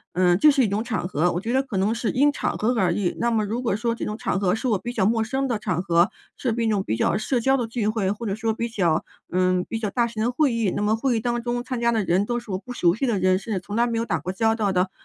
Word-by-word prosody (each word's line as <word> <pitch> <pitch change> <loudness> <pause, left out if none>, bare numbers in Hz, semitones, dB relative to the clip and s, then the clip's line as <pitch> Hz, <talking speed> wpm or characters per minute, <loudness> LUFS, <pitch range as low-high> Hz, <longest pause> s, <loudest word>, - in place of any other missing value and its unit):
嗯， 180 -1 +4
这 300 +7 +6
是 275 -2 +3
一 - - +2
种 205 +3 -1
场 220 -7 -2
合， 175 0 +1
我 175 - -2
觉 225 +3 -3
得 265 - +2
可 255 -6 -7
能 200 +4 +1
是 235 -1 -1
因 290 +3 +3
场 - - -2
合 220 +3 +1
而 180 -4 +2
异。 180 -2 -1
那 235 0 +1
么 220 -2 +1
如 230 +5 -3
果 230 -5 +1
说 230 +2 -1
这 - - -4
种 210 - -3
场 190 - -1
合， 190 -2 +1
是 225 +4 -2
我 220 -4 +2
比 240 +5 -6
较 190 - +2
陌 225 0 +2
生 265 +4 -1
的 240 -4 0
场 185 -5 -2
合， 170 +1 +3 0.3
是 240 -4 -1
一 230 -1 0
种 205 -3 +1
比 110 - -1
较 115 - +1
社 240 +4 0
交 265 +3 +2
的 245 - -1
聚 225 -2 -2
会， 215 -3 0
或 220 +3 -5
者 195 - -1
说 220 0 -1
比 235 +1 -3
较， 175 -8 +1 0.3
嗯， 185 0 +1
比 225 - -3
较 215 -2 -2
大 235 +4 +1
型 230 -2 -4
的 240 - +1
会 275 -1 +2
议， 230 -4 +1
那 - - -1
么 210 +1 +2
会 245 +1 0
议 - - 0
当 240 +1 -1
中 240 0 -2
参 250 -2 -4
加 235 - +3
的 225 -2 +1
人 185 +3 +1
都 240 0 -1
是 235 -3 -10
我 185 - -2
不 250 +5 -10
熟 175 -7 +3
悉 260 +6 -1
的 225 -5 +1
人， 185 0 +2
甚 215 +3 -8
至 - - -1
从 205 +3 -7
来 235 +1 +3
没 230 - -2
有 230 - 0
打 210 - -1
过 185 - -4
交 220 +3 +1
道 215 -3 0
的， 185 0 +1
220 Hz, 350 characters per minute, -24 LUFS, 190-235 Hz, 0.3 s, 这